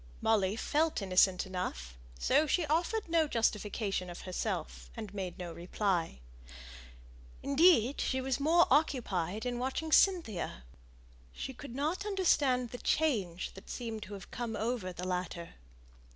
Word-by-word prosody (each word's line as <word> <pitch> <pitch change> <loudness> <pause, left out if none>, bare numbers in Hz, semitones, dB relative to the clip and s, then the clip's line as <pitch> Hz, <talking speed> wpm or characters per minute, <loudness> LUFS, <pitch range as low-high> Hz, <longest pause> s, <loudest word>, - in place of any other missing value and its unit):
Molly 205 -3 +2
felt 310 +7 +1
innocent 190 -1 +3
enough, 65 - -5 0.2
so 295 - +3
she 325 +3 +2
offered 345 +8 0
no 325 -2 +3
justification 210 -5 -1
of 175 - -8
herself, 185 -2 -4
and 215 -3 -6
made 190 -3 -4
no 175 -2 -6
reply. 175 - -1 1.2
Indeed 280 -3 +4
she 260 - 0
was 260 0 -1
more 330 +4 +5
occupied 220 - +1
in 245 -1 -2
watching 265 +5 -2
Cynthia. 265 - +2 0.7
She 265 - -5
could 255 -1 -9
not 315 +8 -1
understand 290 - +2
the 245 - -6
change 205 - 0
that 195 - -13
seemed 225 -3 -5
to 205 0 -7
have 195 - -11
come 235 -2 -4
over 225 -2 -2
her. 180 -1 -4
225 Hz, 135 wpm, -32 LUFS, 185-290 Hz, 1.2 s, more